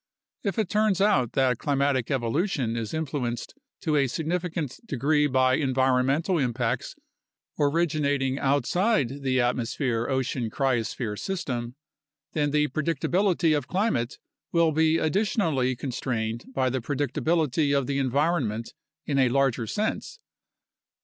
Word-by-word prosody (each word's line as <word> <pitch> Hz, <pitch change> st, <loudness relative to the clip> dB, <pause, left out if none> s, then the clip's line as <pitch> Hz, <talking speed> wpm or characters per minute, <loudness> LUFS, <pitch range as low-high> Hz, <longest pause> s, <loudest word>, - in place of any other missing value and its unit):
If 200 Hz, +1 st, -2 dB
it 220 Hz, -4 st, +1 dB
turns 210 Hz, -1 st, +2 dB
out 195 Hz, -, +2 dB
that 130 Hz, -3 st, +2 dB
climatic 140 Hz, -3 st, +1 dB
evolution 135 Hz, -, 0 dB
is 115 Hz, -2 st, -3 dB
influenced 130 Hz, -7 st, -3 dB, 0.3 s
to 155 Hz, -2 st, 0 dB
a 140 Hz, -1 st, +3 dB
significant 160 Hz, 0 st, -3 dB
degree 150 Hz, -, +2 dB
by 130 Hz, -1 st, +3 dB
environmental 135 Hz, +5 st, +2 dB
impacts 120 Hz, -2 st, -1 dB, 0.6 s
originating 145 Hz, -3 st, +1 dB
outside 145 Hz, -, +1 dB
the 130 Hz, -1 st, +1 dB
atmosphere 120 Hz, -1 st, 0 dB
ocean 130 Hz, -3 st, -1 dB
cryosphere 120 Hz, -4 st, -1 dB
system, 125 Hz, -11 st, -3 dB, 0.6 s
then 145 Hz, -2 st, +1 dB
the 150 Hz, +1 st, +2 dB
predictability 165 Hz, +2 st, +1 dB
of 145 Hz, -3 st, -2 dB
climate 180 Hz, -, 0 dB, 0.3 s
will 170 Hz, -1 st, +3 dB
be 160 Hz, +1 st, +3 dB
additionally 160 Hz, -, +1 dB
constrained 120 Hz, -3 st, -3 dB
by 130 Hz, -1 st, 0 dB
the 130 Hz, 0 st, -1 dB
predictability 145 Hz, +2 st, +1 dB
of 140 Hz, -, 0 dB
the 140 Hz, +1 st, -1 dB
environment 135 Hz, -4 st, 0 dB, 0.3 s
in 140 Hz, -2 st, 0 dB
a 130 Hz, -2 st, +4 dB
larger 125 Hz, -3 st, +1 dB
sense. 215 Hz, -, -2 dB
140 Hz, 120 wpm, -26 LUFS, 125-160 Hz, 0.6 s, a